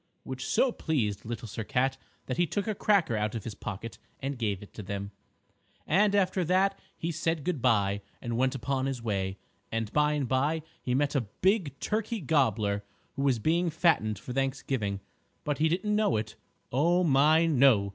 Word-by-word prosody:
_" - - -45 0.2
which 130 0 -5
so 265 - +3
pleased 115 - -1
Little 115 0 -5
Sir 110 +2 -5
Cat 130 +2 +1 0.3
that 130 - -3
he 175 0 +3
took 205 +4 -2
a 215 - +1
cracker 195 - +2
out 105 +1 -1
of 110 - -4
his 115 - -5
pocket 110 +3 -7 0.2
and 140 +1 -3
gave 105 -4 -1
it 105 - -15
to - - -7
them. 100 0 -5 0.7
And 200 +5 +3
after 185 -2 +2
that 190 +3 +2 0.2
he 170 - -2
said 165 -1 -1
good 165 -6 -1
by 100 -5 +2 0.2
and 120 -1 -3
went 130 +2 +1
upon 135 +1 -1
his 130 -4 -4
way, 95 -3 -1 0.3
and 115 -2 -2
by 150 0 +3
and 145 -3 -1
by 145 +5 +1 0.2
he 125 - -1
met 145 +1 +1
a 140 - +2
big 160 - 0
Turkey 220 +1 -1
Gobbler 115 - +1 0.3
who 135 - -4
was 135 -3 +3
being 170 +8 +1
fattened 155 - +2
for 125 +5 -7
Thanksgiving. 130 -6 -1 0.4
But 145 -1 -2
he 160 +1 +3
didn't 210 +5 0
know 210 - +2
it. 110 0 -3 0.4
Oh, 170 +7 +3
my 155 +2 +5
no! 130 -10 +4
135 Hz, 190 wpm, -29 LUFS, 110-165 Hz, 0.7 s, my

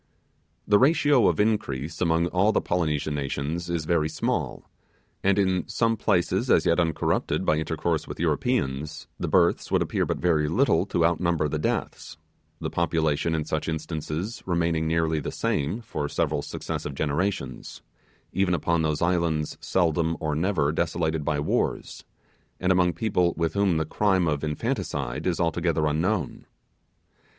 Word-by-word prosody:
The 105 -1 +5
ratio 145 -2 +4
of - - +1
increase 85 -9 -1
among 85 -1 +2
all 95 +5 +3
the - - +2
Polynesian 75 -4 -1
nations 75 +4 -3
is 85 -3 -2
very 80 -2 +1
small; - - -2 0.6
and 100 +1 +3
in 95 -3 +1
some 115 -1 +1
places 90 -4 +1
as - - +4
yet 85 - +3
uncorrupted 80 -2 0
by 75 - +3
intercourse 80 +1 -1
with - - -7
Europeans, 70 +4 -1
the - - -2
births - - +2
would - - +3
appear - - -1
not - - -1
very 80 -4 +2
little - - +2
to 85 - +1
outnumber 85 -2 +1
the 75 +1 -2
deaths; - - -3 0.4
the - - -4
population 80 -1 0
in 80 -1 -2
such 80 0 -2
instances 80 +5 -4
remaining 85 -2 +1
nearly 80 -1 +1
the - - -4
same 75 +11 -1
for 75 -10 -4
several 75 -3 0
successive 70 0 -5
generations, 75 -3 -3 0.5
even 95 -1 +2
upon 85 +1 0
those 80 0 0
islands 85 -3 0
seldom 85 -2 +1
or 80 -2 -1
never 80 -2 +1
desolated 80 -1 -1
by 75 -1 0
wars, 75 - -2 0.5
and 90 0 +1
among 90 -1 +3
people 90 -1 0
with 80 -1 0
whom 100 -4 +2
the 80 - 0
crime 95 +1 +1
of 75 -2 -1
infanticide 75 -3 -2
is 90 - 0
altogether 85 -2 +1
unknown. 80 +3 -1
80 Hz, 150 wpm, -26 LUFS, 75-90 Hz, 0.6 s, The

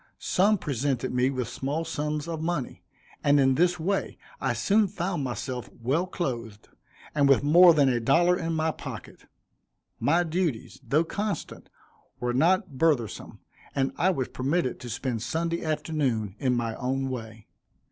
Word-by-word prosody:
Some 205 +3 +2
presented 135 - -2
me 125 +1 +2
with 130 -3 -2
small 140 +6 -3
sums 150 -1 -3
of 165 -2 -4
money, 160 -6 -3 0.4
and 145 0 +4
in 135 -1 +4
this 175 +4 +2
way 195 +4 -1 0.2
I - - 0
soon 210 +1 +2
found 180 -4 -3
myself 125 -1 -4
well 140 +10 0
clothed, 115 - -5 0.4
and 145 -2 +3
with 135 0 +5
more 170 +3 +7
than 145 -3 +4
a 125 -2 +2
dollar 170 +9 +4
in 165 -2 -2
my 160 0 +1
pocket. - - -9 0.7
My 175 +1 +3
duties, 165 -7 -2
though 140 +7 +2
constant, 200 +1 -4 0.5
were 120 0 -1
not 165 - +2
burthensome, 140 - 0 0.3
and 135 -1 +1
I 185 - +2
was 135 -9 -1
permitted 135 +1 -1
to 120 - -8
spend 115 0 -3
Sunday 165 +7 -2
afternoon 150 - -1
in 125 -2 +1
my 115 -1 -1
own 135 +1 -1
way. 115 -3 -7
145 Hz, 155 wpm, -27 LUFS, 125-170 Hz, 0.7 s, more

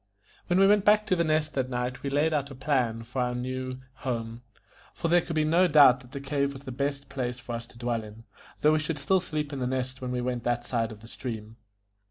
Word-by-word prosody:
When 175 +1 +3
we 195 - +7
went 205 0 +5
back 210 +1 +5
to 185 - +2
The 170 - +2
Nest 155 -1 +1
that 130 -2 -1
night 125 0 -3
we 140 - -2
laid 150 +3 +2
out 140 -2 0
a 135 - -9
plan 125 -4 0
for 125 +3 -3
our 125 0 0
new 130 +1 -4 0.2
home, 115 -3 -4 0.5
for 165 - -1
there 175 +1 +5
could 165 - -5
be 155 - +3
no 170 +4 +4
doubt 145 -5 +7
that 125 0 -16
the 140 - -5
cave 140 0 -1
was 135 0 -10
the 130 - -6
best 140 +2 -2
place 125 -3 -3
for 120 -2 -7
us 115 0 -5
to - - -18
dwell 120 -1 -1
in, 110 +2 -12 0.4
though 150 +1 +5
we 155 - +3
should 155 0 -2
still 185 +7 +2
sleep 155 -4 -3
in 140 - -3
The 125 - -1
Nest 130 0 -3
when 125 - -3
we 125 0 -1
went 125 -1 -2
on 120 - +4
that 120 0 -12
side 115 -2 -1
of 105 -1 -11
the 115 - -12
stream. 115 -2 -6
130 Hz, 265 wpm, -28 LUFS, 120-150 Hz, 0.5 s, we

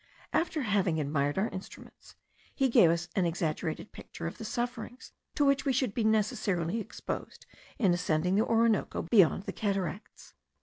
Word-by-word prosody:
After 320 -3 0
having 195 -7 +1
admired 145 0 0
our 210 +4 +1
instruments, 185 - -11 0.4
he 270 -2 +2
gave 180 -7 +6
us 170 +1 0
an 185 -3 +2
exaggerated 165 +1 -3
picture 170 - -9
of 170 - -5
the - - -6
sufferings 245 +2 -4 0.2
to 290 - +3
which 275 0 +3
we 275 - +1
should 255 -4 0
be 230 - -1
necessarily 210 -4 +1
exposed 220 - -6 0.3
in 195 -7 +3
ascending 175 0 0
the 210 +3 +3
Orinoco 230 -2 +1
beyond 185 -1 +4
the - - -5
cataracts. 195 -1 -4
200 Hz, 160 wpm, -30 LUFS, 170-230 Hz, 0.4 s, gave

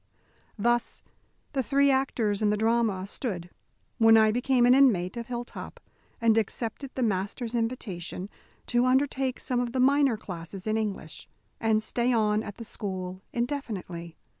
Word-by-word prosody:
Thus 240 +3 0 0.5
the 270 - +1
three 280 +4 +3
actors 235 -6 0
in 210 - +3
the 210 - +1
drama 220 -3 +1
stood, 185 -5 -4 0.5
when 225 0 +7
I 220 -1 +5
became 250 +1 +2
an 245 - +7
inmate 215 -10 +4
of 235 -1 -5
Hilltop, 240 -1 -6 0.4
and 225 -1 +4
accepted 230 +5 -3
the 260 - 0
master's 210 +3 -1
invitation 210 -7 -3 0.4
to 240 +1 +2
undertake 265 0 +1
some 250 -1 -1
of 245 -1 -2
the 260 - 0
minor 275 -2 +4
classes 185 -1 -7
in 215 0 0
English, 205 -7 -4 0.3
and 220 -1 +2
stay 240 +3 0
on 215 -2 +2
at 205 -2 -7
the 230 - -8
school 185 -4 -5
indefinitely. 210 - -4
225 Hz, 150 wpm, -27 LUFS, 205-250 Hz, 0.5 s, when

